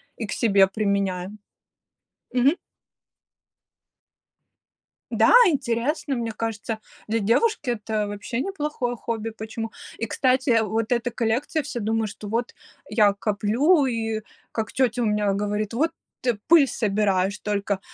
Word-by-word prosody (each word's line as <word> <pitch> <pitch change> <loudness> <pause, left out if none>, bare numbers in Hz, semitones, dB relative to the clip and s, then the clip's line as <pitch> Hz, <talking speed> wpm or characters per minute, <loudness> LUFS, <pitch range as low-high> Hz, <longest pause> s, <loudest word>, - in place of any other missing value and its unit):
и 225 - -4
к 205 - -7
себе 195 -4 +4
применяю. 200 -1 -1 1.0
Мгм. 255 +4 +4 2.6
Да, - - +4
интересно, 275 0 0
мне 230 -2 -2
кажется, 220 -1 -4 0.3
для 225 +1 0
девушки 250 - +2
это 215 -2 -2
вообще 205 +4 -4
неплохое 300 -9 -2
хобби. 225 -1 -4
Почему? 220 +1 -6 0.3
И, 225 - -2
кстати, 260 +2 +1
э, 225 -1 +5
вот 220 +1 -2
эта 245 0 +1
коллекция, 245 +7 -1
все 275 -3 -5
думают, 220 -1 -1
что 210 - -9
вот 230 +3 -2 0.4
я 210 -3 +4
коплю, 220 - +2
и 225 -3 -2 0.3
как 220 -1 -3
тетя 250 -2 +1
у 235 - +1
меня 210 -1 +1
говорит: 210 +2 -2
"Вот 320 +7 +1 0.3
ты 245 -4 0
пыль 315 -5 +7
собираешь 200 -3 0
только!" 200 -1 -1
225 Hz, 130 wpm, -24 LUFS, 210-245 Hz, 2.6 s, пыль